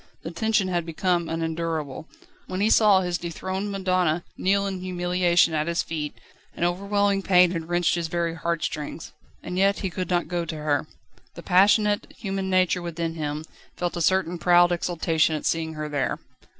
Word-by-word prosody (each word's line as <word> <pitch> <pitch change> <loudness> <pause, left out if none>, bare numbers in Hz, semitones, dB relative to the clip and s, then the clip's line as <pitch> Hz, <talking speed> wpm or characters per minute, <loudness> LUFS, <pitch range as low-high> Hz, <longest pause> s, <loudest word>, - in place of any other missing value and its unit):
The 165 - -5
tension 210 +2 +1
had 175 -2 -1
become 170 +1 -1
unendurable. 160 -3 -3 0.4
When 185 - -4
he 210 +2 +2
saw 205 -4 +5
his 180 -1 -2
dethroned 185 +4 -4
madonna 185 -4 0
kneel 200 +1 +1
in 195 -2 -3
humiliation 180 -2 +2
at 155 0 0
his 170 0 0
feet, 150 -2 -4 0.4
an - - -3
overwhelming 200 +3 +1
pain 180 -2 +5
had 165 -2 -4
wrenched 175 0 +2
his 170 -1 -1
very 170 0 -1
heart 170 0 -2
strings. 155 +1 -5 0.3
And 180 - -3
yet 200 +1 +2
he 190 -3 -2
could 185 +1 -4
not 175 -1 +1
go 175 -1 -2
to 160 -1 -5
her. 150 0 -1 0.5
The 170 - -9
passionate, 205 +3 +3
human 195 -2 -3
nature 185 -1 +2
within 170 -1 -3
him 150 -1 -4 0.3
felt 175 0 -2
a 170 - -3
certain 180 0 +1
proud 175 0 +5
exultation 165 -2 +1
at 150 - -5
seeing 160 -1 -1
her 155 0 -4
there. 145 -3 -1
175 Hz, 175 wpm, -25 LUFS, 165-185 Hz, 0.5 s, saw